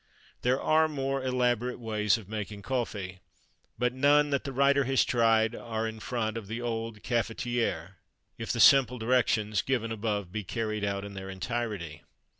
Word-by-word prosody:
There 125 Hz, +2 st, +2 dB
are 160 Hz, 0 st, +3 dB
more 135 Hz, -2 st, -2 dB
elaborate 125 Hz, -1 st, 0 dB
ways 110 Hz, -2 st, +1 dB
of 110 Hz, -4 st, -11 dB
making 105 Hz, -1 st, -6 dB
coffee; 105 Hz, -7 st, -3 dB, 0.6 s
but 125 Hz, 0 st, 0 dB
none 145 Hz, +2 st, +4 dB
that 140 Hz, -, 0 dB
the 135 Hz, -, -3 dB
writer 140 Hz, +1 st, +3 dB
has 135 Hz, +1 st, +3 dB
tried 115 Hz, -1 st, +3 dB
are 115 Hz, -1 st, -3 dB
in 110 Hz, 0 st, -6 dB
front 110 Hz, -1 st, -2 dB
of 110 Hz, -3 st, -7 dB
the 115 Hz, +3 st, -4 dB
old 115 Hz, -2 st, -4 dB
cafetière, 115 Hz, -6 st, -2 dB, 0.4 s
if -, -, -4 dB
the -, -, -2 dB
simple 130 Hz, -3 st, +6 dB
directions 110 Hz, -3 st, +1 dB
given 120 Hz, -4 st, -1 dB
above 105 Hz, -4 st, -2 dB
be 110 Hz, +1 st, -4 dB
carried 110 Hz, +1 st, -3 dB
out 100 Hz, 0 st, -2 dB
in 100 Hz, -, -8 dB
their 95 Hz, 0 st, -7 dB
entirety. 95 Hz, -5 st, -4 dB
115 Hz, 165 wpm, -29 LUFS, 105-125 Hz, 0.6 s, simple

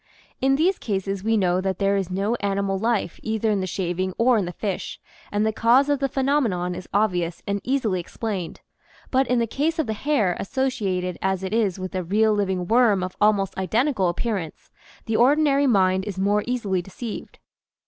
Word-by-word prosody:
In 270 Hz, +1 st, +3 dB
these 345 Hz, +6 st, +2 dB
cases 195 Hz, -2 st, -3 dB
we 225 Hz, +1 st, +2 dB
know 185 Hz, -2 st, +2 dB
that 190 Hz, -1 st, -2 dB
there 200 Hz, 0 st, +2 dB
is 195 Hz, -2 st, -1 dB
no 195 Hz, +4 st, -1 dB
animal 200 Hz, -1 st, -1 dB
life 225 Hz, -5 st, -1 dB
either 220 Hz, 0 st, 0 dB
in 205 Hz, -, +1 dB
the 185 Hz, -, -2 dB
shaving 185 Hz, 0 st, -2 dB
or 245 Hz, +2 st, +4 dB
in 205 Hz, -4 st, +1 dB
the 175 Hz, -, -4 dB
fish, 195 Hz, +1 st, -4 dB, 0.3 s
and 205 Hz, +1 st, +1 dB
the 220 Hz, -, +1 dB
cause 245 Hz, +6 st, +4 dB
of 285 Hz, -1 st, +2 dB
the 275 Hz, 0 st, 0 dB
phe 270 Hz, -, -1 dB
nomenon 210 Hz, -11 st, +1 dB
is 180 Hz, 0 st, -9 dB
obvious 180 Hz, -5 st, 0 dB
and 200 Hz, 0 st, -2 dB
easily 240 Hz, -8 st, 0 dB
explained; 190 Hz, 0 st, -5 dB, 0.5 s
but 265 Hz, 0 st, +2 dB
in 250 Hz, -, +2 dB
the 235 Hz, -, +2 dB
case 300 Hz, +8 st, -1 dB
of 315 Hz, -, +1 dB
the 220 Hz, -, -2 dB
hair, 215 Hz, -7 st, +1 dB
associated 195 Hz, -7 st, -2 dB
as 190 Hz, -1 st, -1 dB
it 190 Hz, +2 st, -3 dB
is 210 Hz, -5 st, +1 dB
with 185 Hz, +1 st, -6 dB
a 185 Hz, -, -1 dB
real 215 Hz, +5 st, +2 dB
living 190 Hz, -3 st, -1 dB
worm 220 Hz, -3 st, +3 dB
of 185 Hz, 0 st, -5 dB
almost 205 Hz, -2 st, +2 dB
identical 215 Hz, 0 st, +1 dB
appearance, 175 Hz, -3 st, -4 dB, 0.3 s
the 220 Hz, -1 st, 0 dB
ordinary 285 Hz, +2 st, +4 dB
mind 190 Hz, -4 st, +3 dB
is 200 Hz, -3 st, -5 dB
more 205 Hz, +2 st, +1 dB
easily 210 Hz, -7 st, -1 dB
deceived. 210 Hz, +5 st, -8 dB
205 Hz, 195 wpm, -23 LUFS, 185-240 Hz, 0.5 s, or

